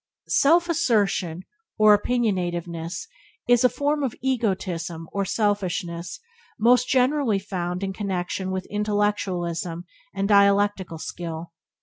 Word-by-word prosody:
Self 340 +5 +4
assertion 205 - +1 0.3
or 215 -1 +7
opinionativeness 180 - -2 0.4
is 245 0 +4
a 250 - +6
form 290 +3 -1
of 265 -5 -2
egotism 185 -9 -2
or 200 -1 0
selfishness 185 -5 -2 0.4
most 245 +2 +4
generally 260 -4 +2
found 185 -2 -4
in 195 0 -2
connection 190 -1 -3
with 190 0 -3
intellectualism 190 -5 -1 0.3
and 195 0 -2
dialectical 200 -3 +3
skill. 165 0 -6
200 Hz, 105 wpm, -24 LUFS, 175-225 Hz, 0.4 s, or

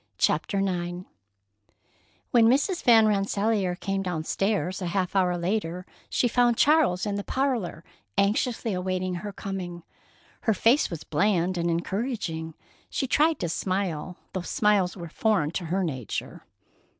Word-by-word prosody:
CHAPTER 200 - +1
IX 180 -2 -2 1.3
When 230 -2 +6
Mrs. 290 - +2
Van 225 -2 +6
Rensselaer 200 -2 +1
came 195 +2 -2
down 175 -4 -3
stairs 195 +1 -1
a 180 - -2
half 185 +1 -1
hour 180 -2 +2
later 180 -1 -2 0.2
she 245 - +2
found 240 0 +3
Charles 285 - +4
in 205 -1 -1
the 200 - -3
parlor 245 - -1 0.3
anxiously 220 +2 +1
awaiting 185 0 -2
her 205 - -5
coming. 180 -4 -6 0.6
Her 220 - +1
face 235 +9 +3
was 165 -3 -6
bland 180 +3 +1
and 170 0 0
encouraging. 170 - -2 0.3
She - - -1
tried 310 +5 +3
to 170 - -1
smile, 180 -1 -2 0.2
though 185 - -2
smiles 195 0 +1
were 170 -1 -6
foreign 165 -3 +1
to 175 +1 -3
her 185 +4 0
nature. 130 - -5
190 Hz, 140 wpm, -26 LUFS, 175-220 Hz, 1.3 s, When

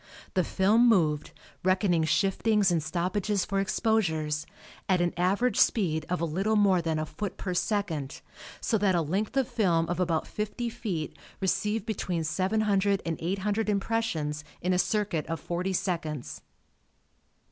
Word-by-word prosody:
The 185 - +2
film 215 +8 +4
moved, 155 -8 +2 0.3
reckoning 185 -3 +2
shiftings 195 +5 +2
and 165 -2 +2
stoppages 185 +5 -1
for 195 0 -1
exposures, 170 -7 0 0.4
at 185 -1 +4
an 175 0 +1
average 200 +6 +1
speed 160 -8 +2
of 180 - 0
a 170 - 0
little 195 +7 0
more 195 -4 +4
than 165 -1 -1
a 155 - -1
foot 205 +4 -5
per 185 - -3
second, 170 -8 -2 0.4
so 220 - 0
that 195 -2 +3
a 170 - +3
length 200 - -2
of 265 -3 +2
film 170 -7 +1
of 175 - -2
about 165 -3 +1
fifty 215 +3 -3
feet 200 -10 -4 0.2
received 200 +3 0
between 180 -6 -2
700 200 +3 +1
and 165 -1 -2
800 200 +5 -1
impressions 195 -8 -1 0.2
in 180 +1 0
a 180 - +2
circuit 200 -6 0
of 165 0 -3
40 180 +2 -2
seconds. 170 -7 -3
185 Hz, 150 wpm, -28 LUFS, 165-210 Hz, 0.4 s, film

